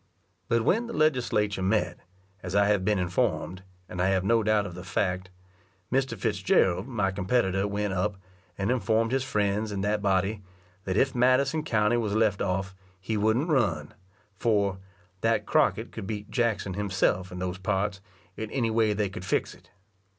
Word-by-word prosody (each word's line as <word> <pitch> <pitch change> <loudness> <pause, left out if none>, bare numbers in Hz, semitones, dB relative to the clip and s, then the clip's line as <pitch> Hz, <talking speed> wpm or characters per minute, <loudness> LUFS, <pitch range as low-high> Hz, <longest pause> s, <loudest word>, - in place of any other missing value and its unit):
But 115 -1 +2
when 230 +4 +2
the 235 - -6
Legislature 120 -9 +1
met, 95 -2 0 0.4
as 90 +1 -5
I 100 0 +5
have 105 -3 +2
been 105 +1 +2
informed, 90 0 -1 0.3
and 90 - -4
I 90 - +3
have 95 -1 +2
no 115 +3 +3
doubt 105 -1 +2
of 95 - -6
the 90 +1 -8
fact, 95 -1 -1 0.6
Mr. 130 -2 0
Fitzgerald, 95 0 +1
my 105 -7 0
competitor, 95 0 +1
went 100 -1 -2
up, 95 +2 -1 0.4
and 100 +4 0
informed 115 -2 +1
his 135 0 +1
friends 105 -2 0
in 100 -1 -3
that 105 +1 0
body, 100 +1 +1 0.4
that 95 +1 -1
if 130 +2 +3
Madison 130 +5 +3
county 110 -4 +2
was 105 -3 -1
left 110 -3 +2
off, 95 0 -1 0.3
he 100 +4 -3
wouldn't 110 +9 +1
run; 95 - +1 0.5
for 100 -4 +1 0.4
"that 115 0 +1
Crockett - - +1
could 95 - -7
beat 105 -1 -5
Jackson 115 -6 0
himself 95 -2 0
in 90 - -7
those 90 +1 -3
parts, 95 0 -1 0.3
in 110 -1 -5
any 115 -3 0
way 110 -1 +2
they 105 0 0
could 95 -1 -8
fix - - -1
it." - - -20
105 Hz, 170 wpm, -27 LUFS, 95-115 Hz, 0.6 s, I